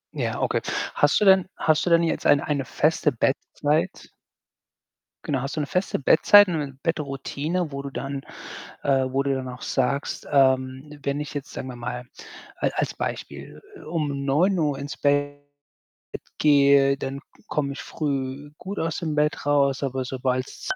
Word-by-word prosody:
Ja, - - -2
okay. - - 0 0.3
Hast - - +3
du 210 - +2
denn 190 -1 +5
hast 155 +2 +2
du - - +3
denn 170 0 +5
jetzt 165 - 0
ein 145 - +6
eine 140 -3 -2
feste 155 -1 +1
Bettzeit? 145 +4 -1 1.1
Genau, 135 -4 -1
hast 135 +3 -4
du 155 - -1
'ne 145 - -1
feste 180 -3 -1
Bettzeit 205 +8 +6
und 165 - -1
'ne 140 -3 -5
Bettroutine, 155 +2 -2
wo 140 0 -4
du 140 - -6
dann 135 0 -5 0.6
äh, 135 -2 +2
wo 135 +1 0
du 140 - 0
dann 130 -1 -3
auch 125 0 -8
sagst, 140 +2 -1
ähm: 130 +1 +1
„Wenn 140 +2 -2
ich 150 - -6
jetzt, 145 -2 -6
sagen 130 - -6
wir 125 - -8
mal, 125 +1 -5 0.5
al - - 0
als - - -1
Beispiel, - - -6 0.2
um 150 -4 -2
09:00 150 -1 +2
ins 140 +1 -6
Bett 145 0 +1 1.0
gehe, 140 -2 +5
dann 135 0 -5
k - - -33 0.2
komme 140 -2 -1
ich - - -7
früh 140 -1 -3
gut 200 +2 -6
aus 165 -1 -2
dem 160 -3 -3
Bett 150 -1 0
raus, 140 -2 +2
aber 130 -1 -2
sobald's“ 130 - -3
140 Hz, 170 wpm, -24 LUFS, 135-150 Hz, 1.1 s, ein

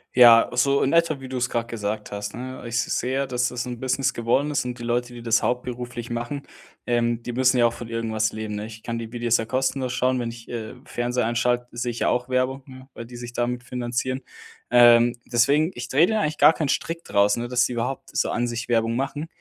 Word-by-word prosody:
Ja, 120 -2 +8
so 140 +3 +3
in 135 - +2
etwa, 165 -4 +2
wie 130 - -8
du 130 - -4
es 125 0 0
grad 115 -1 -1
gesagt 105 -2 -4
hast, 105 0 -5
ne? 130 +2 -7
Ich 115 - -7
s - - 0
sehe, 135 +2 -1
dass 125 0 0
es 125 0 -4
'n 120 -1 -6
Business 130 +1 0
geworden 120 +5 0
ist 140 -3 -1
und 125 0 -5
die - - -7
Leute, 120 +1 -1
die 120 - -9
das 115 -1 +2
hauptberuflich 125 -1 -3
machen, 120 +4 -4 0.4
ähm, 120 -1 +1
die 120 - -5
müssen 130 +1 +3
ja 120 - +6
auch 115 - -3
von 120 - -8
irgendwas 110 -2 -1
leben, 110 -1 -4
ne? 105 +1 -4
Ich 110 0 -10
kann 115 -1 -4
die 115 -1 -6
Videos 120 -1 +1
ja 115 - -3
kostenlos 130 +1 -1
schauen, 130 0 +1
wenn 120 -1 -2
ich, 115 -1 -13
äh, 110 -2 -5
Fernseher 120 -1 -1
einschalte, 120 +1 0
sehe 120 0 -2
ich 115 - -7
ja - - +2
auch 125 +1 0
Werbung, 130 +1 0
ne, 130 0 -13
weil 115 - -7
die 120 0 -11
sich 120 0 -8
damit 125 +1 -2
finanzieren. 125 +1 -3 0.5
Ähm, 120 0 +6 0.2
deswegen, 140 +7 +3
ich 120 0 -6
drehe 155 +7 +4
da 220 -1 +1
eigentlich 150 0 -2
gar 160 - +7
keinen 150 -4 -2
Strick 165 0 -2
draus, 100 +2 +2
ne, 120 - -3
dass 125 +1 +2
die 125 - -3
überhaupt 130 +3 -3
so - - +1
an 120 0 0
sich 120 0 -4
Werbung 115 -1 +1
machen. 145 +4 -3
120 Hz, 240 wpm, -24 LUFS, 115-130 Hz, 0.5 s, Ja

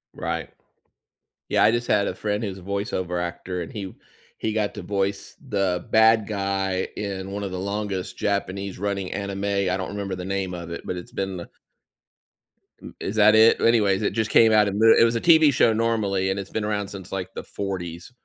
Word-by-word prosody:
Right. - - -3 1.0
Yeah, - - +2
I 110 - +6
just 120 +1 -1
had 105 -2 +2
a - - -3
friend 105 +1 -2
who's 95 -3 -4
a 95 - -12
voiceover 95 -3 -2
actor, 90 +1 -4
and - - -8
he 100 -3 -6 0.4
he 110 - -2
got 105 -2 -1
to - - -7
voice 100 0 -2
the 95 -3 0
bad 110 -1 +5
guy 95 -2 -1
in 95 -2 -4
one 100 +1 -4
of 95 - -5
the 90 - -4
longest 100 -1 -3
Japanese 100 -1 -2
running 100 -1 -3
anime. 100 0 -4
I 100 -2 +1
don't 95 - -4
remember 100 -2 -4
the 90 - -6
name 95 -1 -2
of 85 -1 -7
it, 85 - -6
but 90 - -4
it's 90 - -9
been 95 -1 -3
the 85 - -8 1.3
M - - -11
is 100 - -4
that 110 0 +6
it? 110 +1 +6
Anyways, 105 -4 +3
it 105 - 0
just 110 -1 -1
came 115 -1 +6
out 105 -1 +5
in 100 +1 -2
the 115 0 +7
it - - +7
was 115 0 +3
a 115 - -1
TV 160 -3 +6
show 115 -2 +4
normally, 110 -4 0
and 95 +1 -1
it's 100 - -6
been 110 -1 -3
around 105 -2 -1
since, 95 -2 -9
like, 95 -2 -3
the - - -5
40s, 90 -1 -5
100 Hz, 210 wpm, -24 LUFS, 95-105 Hz, 1.3 s, the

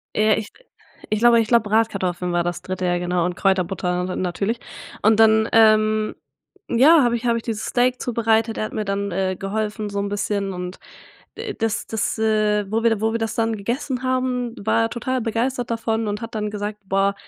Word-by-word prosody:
Äh, 215 0 +4
ich 220 -1 -4 0.6
ich 215 - +1
glaube 235 0 +6
ich 225 - +1
glaube 230 -3 +3
Bratkartoffeln 185 -5 0
war 175 0 +2
das 175 0 -3
dritte 185 0 -4
ja 175 0 +1
genau 175 -1 0
und 180 0 -2
Kräuterbutter, 185 -2 0
na 185 - -4
natürlich 195 +5 -2 0.4
und 215 +1 +4
dann, 220 0 +5
ähm, 215 -1 +4 0.6
ja, 290 +6 +6
habe 240 -1 +2
ich 235 +1 -5
habe 235 -1 +2
ich 230 - -5
dieses 220 -2 -3
Steak 250 0 +1
zubereitet, 225 -1 +1
er - - -1
hat - - -8
mir 215 -1 -2
dann, 200 0 -2
äh, 185 +1 -1
geholfen 210 +2 -3
so 200 0 -3
'n 200 0 -2
bisschen 200 -1 -2
und, 180 0 -6 0.6
äh, 445 -1 -5
das 225 -1 -2
das, 220 0 -2
äh, 215 -2 +1
wo 225 +1 0
wir 225 -2 +2
wo 220 +1 +1
wir 230 - -1
das 225 -1 -2
dann 225 -1 0
gegessen 245 +5 -3
haben, 255 -2 -1
war 220 - +2
er 225 - 0
total 255 +2 -2
begeistert 240 +2 -2
davon 225 -1 -1
und 210 +1 -3
hat 230 0 -7
dann 210 -1 -2
gesagt: 210 0 -5
„Boah, 195 +1 +2
215 Hz, 205 wpm, -22 LUFS, 200-230 Hz, 0.6 s, glaube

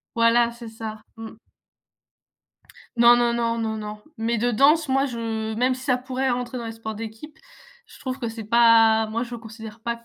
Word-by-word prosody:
voilà, 235 0 +4
c'est 235 -1 -10
ça. 220 -1 -8
Mmh. 225 0 -8 1.7
Non, 235 +1 +7
non, 240 -1 +2
non, 230 -1 0
non, 220 -1 -2
non, 210 0 -7 0.2
mais 230 +1 0
de 240 +2 +1
danse 290 +6 +4
moi, 270 +1 +2
je 225 -3 -4
même 250 +3 +1
si 260 - -10
ça 255 -3 +2
pourrait 260 +1 -3
rentrer 245 +1 -3
dans 235 - -6
les 225 - -5
sports 220 -1 -7
d'équipe, 225 +8 -9 0.5
je - - -16
trouve 260 0 -4
que 235 -4 -3
c'est 225 -1 -7
pas 225 0 +5
moi 225 +2 -2
je 240 -1 -6
considère 225 -1 -11
pas 235 +1 -5
230 Hz, 190 wpm, -23 LUFS, 225-245 Hz, 1.7 s, Non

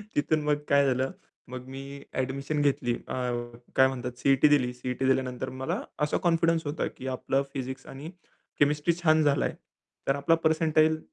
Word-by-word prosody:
तिथून 155 +1 +2
मग 150 0 +1
काय 140 0 +5
झालं, 130 +4 +1 0.4
मग 125 0 -7
मी 135 +1 -7 0.4
एडमिशन 140 +3 -2
घेतली. 130 -4 +1
अ, - - -5 0.6
काय 130 - +6
म्हणतात 125 -2 -4
सी-ई-टी 135 +2 +4
दिली. 130 -4 +3
सी-ई-टी 125 +1 -3
दिल्यानंतर 130 -1 0
मला 130 - -1 0.2
असा 150 - +1
कॉन्फिडन्स 165 -1 +2
होता 145 +3 -2
की 130 - -6
आपलं 135 +1 0
फिजिक्स 130 -1 -5
आणि 140 +4 -8 0.5
केमिस्ट्री 150 +3 +3
छान 155 -1 +5
झालाय. 145 -1 +2 0.5
तर 135 - +3
आपला 140 +4 +3
पर्सेंटाईल 160 0 +3
140 Hz, 155 wpm, -28 LUFS, 130-155 Hz, 0.6 s, काय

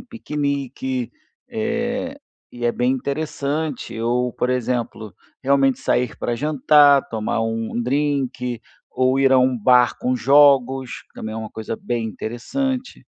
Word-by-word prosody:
piquenique. 150 - -3 0.4
Eh, 240 +3 -2 0.3
e 120 -1 -7
é 120 - +2
bem 125 +1 +1
interessante. 140 -1 -3
Ou, 120 +1 0
por 125 - -1
exemplo, 120 -4 -2 0.3
realmente 135 -1 +3
sair 125 -2 0
pra 120 - -2
jantar, 145 +1 +4
tomar 110 0 -1
um 115 0 -2
um 120 - -1
drink, 130 -3 -1 0.3
ou 130 +1 +1
ir 135 - +4
à 130 - +6
um 125 -1 +2
bar 125 +2 +4
com 125 0 0
jogos, 135 -1 +3
que - - -37
também 110 0 -6
é - - -5
uma 110 -1 -6
coisa 110 0 -5
bem 120 -1 -3
interessante. 255 - -4
130 Hz, 140 wpm, -21 LUFS, 120-150 Hz, 0.4 s, à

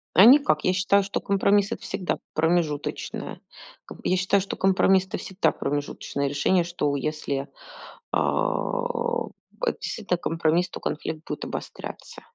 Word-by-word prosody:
А 185 - +9
никак. 245 - +6
Я - - +3
считаю, 195 +2 +3
что 200 - -2
компромисс- 200 0 +2
это - - -8
всегда 190 -2 -2 0.2
промежуточное. 160 -2 -1 0.4
Ком - - -11
я 185 - +3
считаю, 190 +2 +2
что 195 - -4
компромисс 190 0 +3
это - - -4
всегда 190 +2 0
промежуточное 140 0 -3
решение. 170 +6 +2
Что 160 -4 -1
если, 140 -1 -2 0.6
а, 480 -1 0 0.4
это 475 - 0
действительно 195 -5 -2
компромисс, 165 +1 +1
то - - -8
конфликт 155 +1 -4
будет - - -4
обостряться. - - -7
180 Hz, 135 wpm, -25 LUFS, 155-200 Hz, 0.6 s, А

